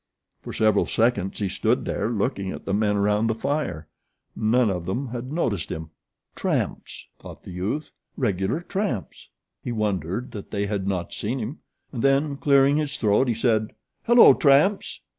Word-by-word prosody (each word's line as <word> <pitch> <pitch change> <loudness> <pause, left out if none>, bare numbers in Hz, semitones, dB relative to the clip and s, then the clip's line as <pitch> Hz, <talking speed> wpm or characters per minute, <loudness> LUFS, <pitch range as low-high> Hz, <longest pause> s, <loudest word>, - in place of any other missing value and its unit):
For - - -8
several 110 -2 +2
seconds 110 -5 +1
he 100 - -1
stood - - 0
there - - -1
looking 105 -3 -1
at - - -7
the 100 - -2
men 105 0 +1
around 105 +2 +2
the 110 - 0
fire. 115 - -2 0.5
None 115 0 +2
of 90 -3 -4
them 120 +9 -3
had 125 +2 -6
noticed 115 - -1
him. 80 0 -6 0.4
"Tramps!" - - -3
thought - - -12
the - - -9
youth. 100 - -3 0.3
"Regular 105 - 0
tramps." 190 - -4 0.3
He 120 - -3
wondered 105 - -2
that 105 -3 -8
they 100 -1 -1
had 100 -2 -2
not 90 -3 -2
seen 115 +6 -3
him, 125 +6 -5 0.3
and 120 - -4
then, 140 +2 +2
clearing 140 0 +4
his 150 -2 -2
throat, 110 +4 +2
he 120 - +1
said: 110 -2 0 0.3
"Hello, 240 0 +8
tramps!" 150 +7 +3
110 Hz, 165 wpm, -24 LUFS, 100-135 Hz, 0.5 s, Hello